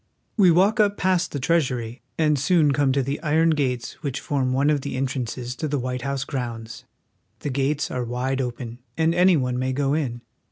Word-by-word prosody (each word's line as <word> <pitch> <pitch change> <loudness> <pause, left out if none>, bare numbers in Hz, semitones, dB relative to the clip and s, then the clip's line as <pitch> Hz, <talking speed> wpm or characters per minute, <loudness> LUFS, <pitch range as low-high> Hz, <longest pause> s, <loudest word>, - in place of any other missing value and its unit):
We 195 -5 +6
walk 195 +7 +4
up 205 -1 +3
past 180 -2 +1
the 145 - -3
Treasury, 125 -6 0 0.2
and 150 -3 +2
soon 155 0 +3
come 140 -1 +2
to 135 0 +1
the 140 +3 -3
iron 160 +1 +3
gates 125 -6 -1
which 140 -4 -3
form 135 -3 -1
one 140 +3 +2
of 145 -2 +1
the - - -4
entrances 125 -2 -3
to 155 - -2
the 145 0 -1
White 125 -1 -3
House 140 0 -2
grounds. 115 -5 -5 0.6
The 145 - -3
gates 140 +3 0
are 125 - -2
wide 125 +3 -2
open, 120 -1 -5 0.2
and 160 0 +2
any 180 0 +5
one 125 -2 -1
may 130 0 -1
go 140 +1 0
in. 130 -6 -2
135 Hz, 200 wpm, -24 LUFS, 125-155 Hz, 0.6 s, We